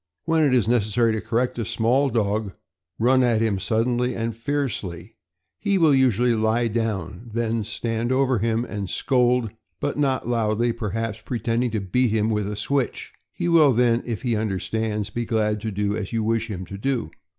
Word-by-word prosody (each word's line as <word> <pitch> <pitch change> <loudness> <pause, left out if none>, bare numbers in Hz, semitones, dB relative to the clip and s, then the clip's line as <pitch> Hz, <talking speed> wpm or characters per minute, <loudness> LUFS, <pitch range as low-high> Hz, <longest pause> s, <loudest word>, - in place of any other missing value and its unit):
When 165 -1 +2
it 145 -3 +3
is 125 -4 +3
necessary 115 0 +2
to 110 - -2
correct 120 +2 -1
a - - 0
small 125 +7 +1
dog, 105 -3 -1 0.4
run 130 +3 +4
at 120 -3 +3
him 110 -4 +1
suddenly 120 +4 0
and 115 0 -2
fiercely; 115 -8 -3 0.5
he 200 -2 +1
will 160 -5 +5
usually 125 -2 +3
lie 115 +1 +1
down; 115 +1 -3
then 115 -1 0
stand 115 +3 -2
over 130 -2 +2
him 115 +2 0
and 100 -5 -5
scold, 125 -3 +1 0.3
but - - -2
not 135 -4 0
loudly, 115 0 +1
perhaps 115 -1 -3
pretending 120 +1 -1
to 110 -1 -2
beat 115 +6 +1
him 110 0 +1
with 105 -2 -1
a - - -4
switch. 135 +5 -2 0.2
He - - -3
will 160 -5 +5
then, 120 0 +3
if 115 -1 -5
he 120 -3 +1
understands, 105 0 -2
be 120 - -2
glad 105 -2 0
to 110 - -3
do 105 0 -1
as 105 -3 -4
you 115 -2 0
wish 115 +1 0
him 95 -3 -5
to 100 +2 -8
do. 120 - -1
115 Hz, 185 wpm, -23 LUFS, 105-125 Hz, 0.5 s, will